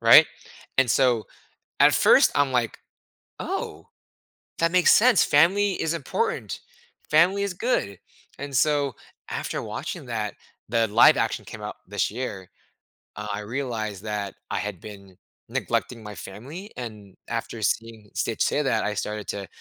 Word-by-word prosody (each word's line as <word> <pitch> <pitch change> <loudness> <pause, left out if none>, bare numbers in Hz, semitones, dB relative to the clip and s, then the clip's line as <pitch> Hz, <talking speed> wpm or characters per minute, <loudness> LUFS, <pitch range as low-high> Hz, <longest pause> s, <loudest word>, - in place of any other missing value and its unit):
right? - - +9 0.5
And 130 -4 +4
so, 125 -5 +3 0.6
at - - +7
first, - - +6
I'm 145 -2 +2
like, 120 -3 0 0.6
"Oh, - - -4 0.7
that 165 0 +2
makes 180 -1 +6
sense. 245 +3 +6
Family 195 +7 +4
is 160 +1 0
important. 460 - -2 0.5
Family 180 +6 +4
is 200 -2 -2
good," 100 - -1 0.4
and 140 0 -6
so, 145 -2 +2 0.4
after - - -3
watching - - -5
that, 110 -3 -3 0.3
the 115 0 +2
live-action 110 +3 +4
came - - -9
out - - -5
this - - -1
year. 105 -5 -5 0.7
Uh, 105 0 -6
I 100 - -3
realized 110 -4 -4
that 105 -2 -3 0.2
I - - 0
had 105 -4 -4
been 100 -3 -11 0.3
neglecting 115 -3 -2
my 105 -1 -7
family, 145 - -9
and 105 -6 -8
after 115 -1 -4
seeing 110 -1 -2
Stitch 115 - 0
say 150 - +1
that, 125 -6 +1
I 105 - -1
started 105 0 -4
to 100 -1 -4
115 Hz, 145 wpm, -25 LUFS, 105-150 Hz, 0.7 s, right